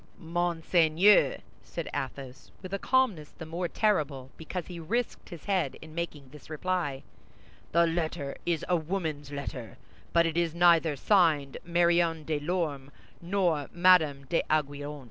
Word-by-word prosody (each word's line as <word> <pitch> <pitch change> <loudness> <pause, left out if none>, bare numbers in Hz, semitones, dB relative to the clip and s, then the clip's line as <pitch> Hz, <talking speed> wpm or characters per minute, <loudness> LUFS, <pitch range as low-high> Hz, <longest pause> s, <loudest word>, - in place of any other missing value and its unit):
"Monseigneur," 170 +2 +3 0.2
said - - -6
Athos, 135 0 -6
with 185 +1 -7
a 200 - -1
calmness 220 - +1
the 160 - -9
more 170 +3 -3
terrible 150 - 0
because 165 +2 -6
he 175 -2 -8
risked 230 +9 -3
his 170 -5 -10
head 195 -3 0
in 155 0 -12
making 155 -5 -5
this 150 +2 -14
reply, 155 -4 -2 0.7
"the 170 +1 +4
letter 165 -4 -2
is 170 -3 -1
a 180 - +2
woman's 160 -4 -3
letter, 135 -5 -6 0.3
but 170 0 +4
it 165 0 -1
is 170 -1 0
neither 170 -3 +4
signed 150 -5 +2
Marion 170 -1 +2
de 150 -1 -2
Lorme, 150 -4 -2 0.3
nor 175 -5 0
Madame 170 -6 +4
d'Aiguillon." 145 -1 -1
165 Hz, 140 wpm, -29 LUFS, 145-175 Hz, 0.7 s, the